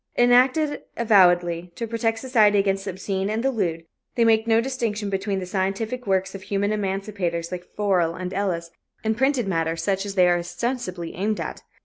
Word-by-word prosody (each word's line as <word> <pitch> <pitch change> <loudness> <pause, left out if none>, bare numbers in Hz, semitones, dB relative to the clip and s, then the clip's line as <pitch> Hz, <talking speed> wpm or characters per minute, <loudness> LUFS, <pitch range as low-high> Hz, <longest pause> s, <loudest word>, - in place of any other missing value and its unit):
Enacted, 255 +5 +4 0.2
avowedly, 175 -6 +3
to 230 - -3
protect 225 0 -1
society 225 -4 +3
against 195 -1 +1
the - - -3
obscene 190 +1 -3
and 220 +2 -1
the 270 - +2
lewd, 170 -8 -2 0.3
they 235 - +3
make 220 0 +3
no 225 0 +4
distinction 230 -5 -2
between 195 +1 -1
the 190 - -3
scientific 200 +6 -2
works 190 -1 +1
of 195 - -7
human 200 +1 -1
emancipators 195 -4 -2
like 180 -1 -5
Forel 185 -5 +1
and 185 +1 -5
Ellis 175 -4 -2 0.3
and 220 0 +1
printed 265 -2 +1
matter 165 -3 0
such 195 +3 -1
as 200 - -5
they 180 -2 +5
are 175 0 +3
ostensibly 185 -2 -4
aimed 210 +3 -1
at. - - -5
200 Hz, 180 wpm, -24 LUFS, 185-225 Hz, 0.3 s, they